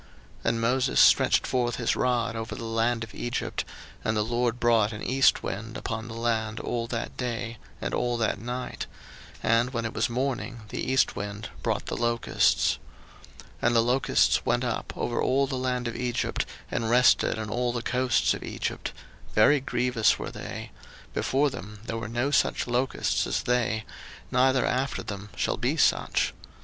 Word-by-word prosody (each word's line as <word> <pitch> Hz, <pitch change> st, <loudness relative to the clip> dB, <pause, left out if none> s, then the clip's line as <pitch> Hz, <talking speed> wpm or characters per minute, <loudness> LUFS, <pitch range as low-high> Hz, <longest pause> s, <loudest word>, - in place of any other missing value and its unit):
02:010:013 -, -, -22 dB
And 115 Hz, 0 st, -1 dB
Moses 125 Hz, +3 st, +2 dB
stretched -, -, +6 dB
forth 120 Hz, -2 st, 0 dB
his 120 Hz, -, 0 dB
rod 120 Hz, -2 st, +1 dB
over 110 Hz, 0 st, -4 dB
the -, -, -7 dB
land 115 Hz, +1 st, 0 dB
of 110 Hz, -, -9 dB
Egypt, 120 Hz, +1 st, -2 dB, 0.4 s
and 110 Hz, 0 st, 0 dB
the 105 Hz, -, +2 dB
LORD 120 Hz, +1 st, 0 dB
brought 115 Hz, -3 st, +3 dB
an 105 Hz, -, -6 dB
east 135 Hz, +1 st, +3 dB
wind 115 Hz, +5 st, -4 dB
upon 115 Hz, -2 st, -4 dB
the 115 Hz, -, -7 dB
land 115 Hz, -2 st, -1 dB
all 115 Hz, -1 st, -2 dB
that 115 Hz, -1 st, -4 dB
day, 115 Hz, -2 st, -3 dB, 0.2 s
and -, -, -3 dB
all 120 Hz, -1 st, 0 dB
that 115 Hz, -3 st, 0 dB
night; 125 Hz, +3 st, -4 dB, 0.6 s
and 115 Hz, +2 st, +3 dB
when 115 Hz, -2 st, -1 dB
it 115 Hz, -, -3 dB
was -, -, +1 dB
morning, 125 Hz, -1 st, -2 dB
the -, -, -4 dB
east 130 Hz, 0 st, +2 dB
wind 100 Hz, +2 st, -5 dB
brought -, -, -1 dB
the -, -, -3 dB
locusts. 120 Hz, 0 st, +2 dB, 0.6 s
02:010:014 -, -, -14 dB, 0.2 s
And 120 Hz, 0 st, +3 dB
the 115 Hz, -, +5 dB
locust 125 Hz, +3 st, +3 dB
went 120 Hz, +1 st, +1 dB
up 120 Hz, -2 st, -2 dB
over 120 Hz, -, -1 dB
all 135 Hz, +2 st, +3 dB
the 135 Hz, 0 st, -3 dB
land 125 Hz, -1 st, -1 dB
of 120 Hz, -, -4 dB
Egypt, 125 Hz, -1 st, -1 dB, 0.2 s
and 115 Hz, -1 st, -1 dB
rested 125 Hz, -1 st, +4 dB
in 110 Hz, -1 st, -4 dB
all 120 Hz, +2 st, 0 dB
the 120 Hz, -1 st, -3 dB
coasts 125 Hz, -1 st, +2 dB
of -, -, -6 dB
Egypt: -, -, -4 dB, 0.4 s
very 125 Hz, +7 st, +6 dB
grievous 125 Hz, -3 st, +2 dB
were -, -, -5 dB
they; -, -, -7 dB, 0.4 s
before 140 Hz, +2 st, +1 dB
them 105 Hz, 0 st, -8 dB
there 115 Hz, -, -3 dB
were 115 Hz, -1 st, -5 dB
no 120 Hz, +5 st, 0 dB
such -, -, +2 dB
locusts 125 Hz, +2 st, 0 dB
as -, -, -1 dB
they, 115 Hz, -3 st, 0 dB, 0.5 s
neither 130 Hz, +1 st, +3 dB
after 130 Hz, +2 st, -1 dB
them 100 Hz, 0 st, -6 dB
shall -, -, 0 dB
be -, -, 0 dB
such. -, -, +2 dB
120 Hz, 180 wpm, -27 LUFS, 115-125 Hz, 0.6 s, stretched